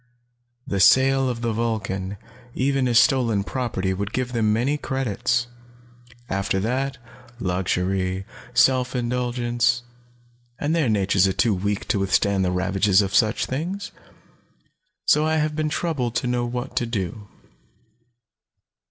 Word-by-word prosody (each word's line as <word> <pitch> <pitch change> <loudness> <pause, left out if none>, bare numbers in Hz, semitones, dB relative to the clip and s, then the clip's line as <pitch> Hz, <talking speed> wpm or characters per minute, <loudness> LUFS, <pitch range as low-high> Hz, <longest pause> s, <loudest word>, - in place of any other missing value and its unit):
The 100 - -2
sale 135 +5 +5
of 120 -2 -4
the 115 -1 -1
Vulcan, 105 -4 -2 0.4
even 135 0 +1
as 120 -2 +3
stolen 120 -7 +3
property, 100 -6 -2
would 100 +3 -4
give 125 -1 -2
them 110 -3 +2
many 120 +7 +1
credits. 125 -3 -1 0.8
After 100 -1 -1
that 130 +6 -1 0.4
luxury, 95 0 -1 0.3
self 130 -1 +3
indulgence. 120 -1 0 0.7
And 150 +4 -1
their 155 -7 +2
natures 95 -2 +3
are 95 - 0
too 115 +1 +2
weak 100 +2 -2
to 100 - +1
withstand 95 0 +2
the 90 - +1
ravages 95 +2 +2
of 95 - -4
such 110 -1 +2
things. 175 +9 -4 1.1
So 150 - +4
I 160 0 +1
have 155 -1 0
been 155 0 0
troubled 140 -6 -2
to - - 0
know 120 -1 0
what 125 +2 -5
to 120 - +1
do. 105 -2 -4
120 Hz, 135 wpm, -23 LUFS, 100-130 Hz, 1.1 s, sale